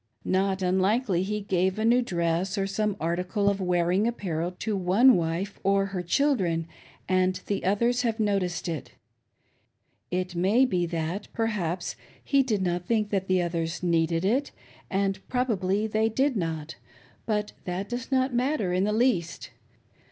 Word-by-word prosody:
Not 190 0 +1
unlikely 190 +2 +2
he 210 +2 -2
gave 190 -1 0
a 220 - 0
new 240 +2 +5
dress 175 -1 -1
or 195 - +1
some 200 +1 -1
article 180 +5 -1
of 200 -1 +1
wearing 180 +3 +2
apparel 175 -8 -2
to 215 -2 -2
one 200 +7 +5
wife 175 +4 -2
or 195 0 +3
her 180 - -1
children, 175 - +1 0.4
and 185 0 +2
the 200 - -2
others 235 +6 +2
have 230 -2 -1
noticed 195 -5 0
it. 165 -3 -5 0.6
> - - -46
It 185 0 -4
may 195 +9 +3
be 180 -7 0
that, 170 +4 -3
perhaps, 190 -6 -2 0.3
he 275 -1 +3
did 215 -7 0
not 175 0 -1
think 215 -3 +1
that 195 -2 0
the 185 -1 +2
others 170 0 -3
needed 165 0 +1
it, 260 +8 +1 0.4
and 195 -1 0
prohably 210 -5 0
they 220 +1 +1
did 265 +4 +1
not; 160 -4 -3 0.5
but 210 -2 -1
that 185 +2 -3
does 245 +2 -5
not 260 0 +2
matter 245 -7 0
in 185 +2 +2
the 210 - 0
least. 215 - 0
195 Hz, 160 wpm, -27 LUFS, 175-220 Hz, 0.6 s, new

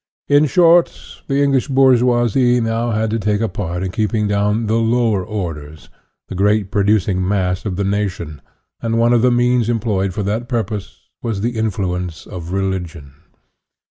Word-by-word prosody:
In 145 +1 +4
short, 170 +3 +4 0.3
the 140 0 +1
English 135 -2 +1
bourgeoisie 125 -2 +3
now 115 +1 -1
had 110 -1 -1
to 115 - -1
take 105 0 0
a 115 - 0
part 90 -3 -4
in 95 - -3
keeping 105 +1 -1
down 105 +2 0
the 110 +1 +1
"lower 115 -3 +1
orders," 80 -8 -6 0.4
the - - -7
great 100 +1 +1
producing 100 -2 +1
mass 95 -2 -1
of 95 - -3
the 100 - -1
nation, 95 -7 -3 0.4
and 115 0 -1
one 120 +1 +3
of 120 - +3
the 125 - +4
means 120 -1 +2
employed 105 -5 0
for 105 - -2
that 110 +5 -3
purpose 110 -5 -4
was 110 -4 -3
the 120 +2 -2
influence 90 -6 -3
of 85 -1 -8
religion. 90 -7 -4
105 Hz, 165 wpm, -18 LUFS, 95-120 Hz, 0.4 s, In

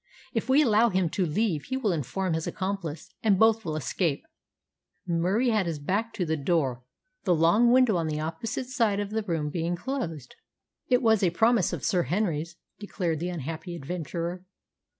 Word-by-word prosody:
If - - -2
we 280 +3 +6
allow 230 -2 +4
him 185 -4 0
to 185 -3 0
leave 165 -2 0
he 260 - -2
will 225 -7 0
inform 170 +4 -2
his 160 0 -2
accomplice, 190 -3 -4
and 205 -4 +3
both 225 +1 +4
will 155 -4 -3
escape." 155 +2 -1 0.8
Murie 185 +8 +1
had 215 -5 +1
his 165 -2 -2
back 200 +10 -1
to 180 - -1
the 160 0 0
door, 140 -5 0 0.4
the 180 -3 +3
long 175 +10 +4
window 250 -6 +5
on 165 -2 -1
the 155 -1 -2
opposite 165 +11 -3
side 230 -6 +1
of 205 0 -3
the 220 +1 0
room 165 -7 -2
being 170 +1 -1
closed. 170 - -4 0.5
"It 250 0 +3
was 220 -2 +4
a 185 - +4
promise 225 +2 +3
of - - -5
Sir 180 - +2
Henry's," 170 - -1 0.2
declared 175 -6 -2
the 175 +2 -2
unhappy 165 +2 -5
adventurer. 170 +3 -4
180 Hz, 180 wpm, -27 LUFS, 160-220 Hz, 0.8 s, we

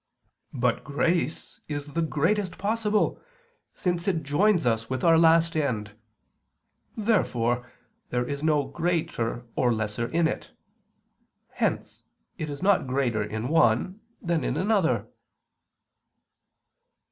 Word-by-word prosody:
But 125 -2 0
grace 155 +1 -1
is 145 -1 -5
the 165 - 0
greatest 170 +5 0
possible, 210 +1 0 0.5
since 175 +1 -2
it 165 -5 0
joins 170 +4 +2
us 115 -1 0
with 130 -1 -3
our 165 -1 +6
last 165 0 +4
end. 115 -9 -1 1.1
Therefore 125 - 0 0.4
there 125 0 0
is 140 0 -4
no 150 -2 +2
greater 135 -6 -2
or 125 - +2
less 110 -2 -2
in 160 +8 +1
it. - - -5 1.0
Hence - - -2 0.4
it 155 - -3
is 145 +4 -6
not 195 -8 +3
greater 125 -4 0
in 110 +3 -4
one 160 - +2 0.2
than 170 -2 -1
in - - -1
another. 195 -4 +1
155 Hz, 115 wpm, -26 LUFS, 125-175 Hz, 1.1 s, our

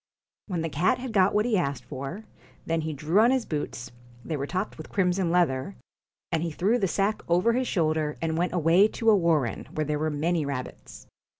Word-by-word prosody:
14 195 - -7
When 165 - -1
the 165 -3 -4
cat 180 - +3
had 250 -2 -6
got 190 -1 +4
what 210 +1 +3
he 235 -4 +2
had 180 - +2
asked 130 -3 -6
for, 135 - -6
PUSS 220 - -26
then 165 0 0
he 160 0 -3
drew 155 +7 +1
on 230 +2 +6
his 260 -2 +1
boots 145 -5 -4 0.3
they 160 - -2
were 140 -1 -3
topped 185 +5 -3
with 155 - -8
IN - - -21
crimson 185 -2 +1
leather 170 -1 +1 0.6
and 165 -2 0
he 170 - -1
threw 200 +10 +1
the 195 - +1
sack 200 +4 0
over 180 +7 +3
his 255 +2 0
BOOTS - - -3
shoulder, 155 -4 0
and 160 -1 -1
went 175 +2 0
away 175 +4 +4
to 225 0 +2
a - - +6
warren, 165 - +1
where 155 - -2
there 150 0 -1
were 155 +1 0
many 160 +2 0
rabbits. 140 -3 -6
170 Hz, 235 wpm, -26 LUFS, 150-200 Hz, 0.6 s, on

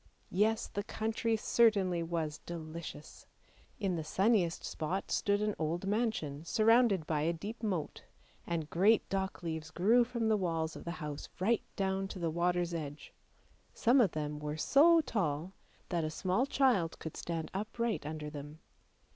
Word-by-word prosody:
Yes, 215 +4 +2
the 205 - -4
country 220 +2 -1
certainly 200 -6 +3
was 165 -2 -2
delicious. 160 -2 -8 0.5
In 190 -4 0
the 160 - -3
sunniest 190 0 +1
spot 180 +5 -3
stood 205 +1 +1
an 210 0 +1
old 165 +4 -1
mansion 195 -9 -1
surrounded 220 -2 +4
by 150 -1 0
a 160 +3 +2
deep 205 +8 -6
moat, 185 -9 -3 0.4
and 165 -3 -2
great 200 +8 +3
dock 190 -1 -2
leaves 160 -1 -4
grew 220 +9 +4
from 235 -1 -2
the 220 -1 +3
walls 165 -4 -1
of - - -9
the 170 - -3
house 145 -1 -6
right 220 +5 +2
down 195 0 0
to 195 - -7
the 170 -3 -1
water's 175 +1 0
edge; 150 -3 -6 0.6
some 250 +3 +4
of 200 -8 +2
them 150 -1 -3
were 150 0 -4
so 325 - +6
tall 180 - -2 0.4
that 170 -3 0
a 155 - -1
small 190 - 0
child 245 -13 +2
could 160 - -7
stand 165 -2 -4
upright 220 +3 -2
under 150 0 -5
them. 145 +1 -8
180 Hz, 160 wpm, -33 LUFS, 160-215 Hz, 0.6 s, so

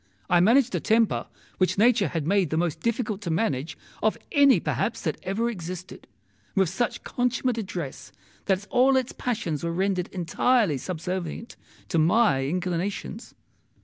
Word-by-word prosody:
I 175 - +6
managed 235 +7 +4
a - - +1
temper 225 0 +2 0.3
which 185 +1 +2
nature 215 -3 +4
had 155 -1 -3
made 190 -1 +2
the 155 - -1
most 170 -2 0
difficult 225 -3 -2
to 185 - -4
manage 160 - -1 0.2
of 215 - +1
any 280 -2 +6
perhaps - - -2
that - - -2
ever 210 +5 -1
existed, 185 -4 -7 0.5
with 190 -4 +3
such 240 +6 -2
consummate 245 -1 -1
address 175 -9 -6 0.3
that 190 0 0
all 265 +1 +4
its 260 -1 -1
passions 170 - -3
were 170 - -1
rendered 185 0 0
entirely 185 - +1
subservient 180 - -5 0.3
to 165 - +1
my 155 - +3
inclinations. 180 - -3
190 Hz, 145 wpm, -26 LUFS, 170-230 Hz, 0.5 s, I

